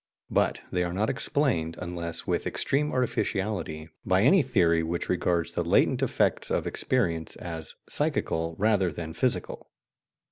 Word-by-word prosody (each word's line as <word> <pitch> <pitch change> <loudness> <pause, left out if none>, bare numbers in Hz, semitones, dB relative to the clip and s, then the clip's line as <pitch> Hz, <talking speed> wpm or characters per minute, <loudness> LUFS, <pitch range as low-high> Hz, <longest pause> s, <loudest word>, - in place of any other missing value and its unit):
But - - +1
they 90 -1 +1
are 85 0 -3
not 105 +3 +1
explained, 120 - 0
unless 85 -2 -4
with - - -1
extreme 150 +2 0
artificiality, 95 -10 -1 0.2
by 95 +1 +3
any 180 +9 +6
theory 90 - +2
which 85 +1 -3
regards 85 -2 +1
the - - -1
latent - - +3
effects - - +1
of - - 0
experience 85 -11 0
as 80 -2 -5
psychical 80 0 0
rather 100 -4 +2
than 80 0 -6
physical. 125 +7 -2
90 Hz, 140 wpm, -27 LUFS, 85-110 Hz, 0.2 s, any